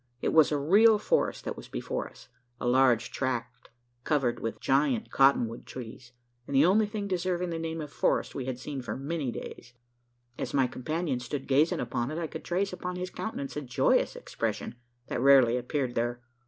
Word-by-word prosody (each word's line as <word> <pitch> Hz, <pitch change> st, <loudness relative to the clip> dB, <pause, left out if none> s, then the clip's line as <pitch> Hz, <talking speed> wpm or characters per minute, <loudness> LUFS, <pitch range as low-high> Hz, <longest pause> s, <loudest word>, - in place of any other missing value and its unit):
It -, -, -1 dB
was 160 Hz, -1 st, +6 dB
a 150 Hz, -, +2 dB
real 205 Hz, +10 st, +5 dB
forest 485 Hz, -, 0 dB
that -, -, -3 dB
was -, -, -10 dB
before -, -, -4 dB
us -, -, -17 dB, 0.3 s
a -, -, -2 dB
large 125 Hz, -2 st, +3 dB
tract 125 Hz, -2 st, -3 dB, 0.3 s
covered 135 Hz, -6 st, +1 dB
with 110 Hz, -1 st, -4 dB
gigantic 150 Hz, -, +1 dB
cotton 135 Hz, -3 st, +4 dB
wood 115 Hz, +1 st, -9 dB
trees, 120 Hz, 0 st, -9 dB, 0.4 s
and 140 Hz, -, -3 dB
the 140 Hz, +3 st, +6 dB
only 210 Hz, +4 st, +4 dB
thing 205 Hz, -1 st, -4 dB
deserving 180 Hz, -1 st, -1 dB
the 165 Hz, -, -3 dB
name 165 Hz, 0 st, -3 dB
of 150 Hz, -2 st, -7 dB
forest -, -, +1 dB
we 130 Hz, -, -4 dB
had 130 Hz, -1 st, -3 dB
seen 135 Hz, +1 st, -5 dB
for 120 Hz, -, -5 dB
many 140 Hz, -1 st, -3 dB
days. 120 Hz, +1 st, -9 dB, 0.7 s
As -, -, -3 dB
my 135 Hz, -2 st, +4 dB
companion 140 Hz, +2 st, -2 dB
stood 135 Hz, +3 st, -5 dB
gazing 145 Hz, +4 st, +3 dB
upon 120 Hz, 0 st, -2 dB
it, 155 Hz, -, -4 dB
I 170 Hz, -, -2 dB
could -, -, -7 dB
trace 190 Hz, +2 st, -1 dB
upon 180 Hz, 0 st, -4 dB
his 180 Hz, 0 st, -4 dB
countenance 140 Hz, -11 st, -5 dB
a 150 Hz, -, -2 dB
joyous 125 Hz, -3 st, +2 dB
expression, -, -, -4 dB, 0.3 s
that 120 Hz, -, -3 dB
rarely 130 Hz, -3 st, +6 dB
appeared 125 Hz, +1 st, -2 dB
there. 120 Hz, +1 st, -1 dB
140 Hz, 195 wpm, -29 LUFS, 125-170 Hz, 0.7 s, was